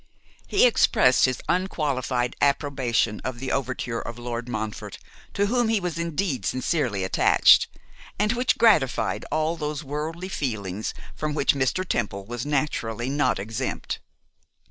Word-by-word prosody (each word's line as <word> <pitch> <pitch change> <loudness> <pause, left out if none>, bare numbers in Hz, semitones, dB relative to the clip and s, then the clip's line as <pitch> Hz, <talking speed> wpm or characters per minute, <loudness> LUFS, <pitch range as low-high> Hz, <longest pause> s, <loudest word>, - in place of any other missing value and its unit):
He - - +4
expressed 130 - +4
his 130 -1 -2
unqualified 135 -9 -1
approbation 135 -6 +1
of 130 -2 -4
the 130 +1 -3
overture 125 -3 -2
of 115 +1 -7
Lord 120 0 -5
Montfort, 110 -3 -5 0.4
to 200 - +2
whom 240 +2 +1
he 225 -2 +2
was 175 -3 -3
indeed 170 - -1
sincerely 125 - 0
attached, 95 - +5 0.5
and 210 +3 +2
which 245 0 +1
gratified 125 - +3
all 155 +2 0
those 150 -2 -4
worldly 155 +6 -4
feelings 110 - -3 0.2
from 155 -1 -3
which 145 - +3
Mr. 140 +7 0
Temple 100 -7 -2
was 120 +5 -5
naturally 130 -5 -1
not 145 +1 +1
exempt. 105 +3 -4
135 Hz, 135 wpm, -25 LUFS, 120-160 Hz, 0.5 s, attached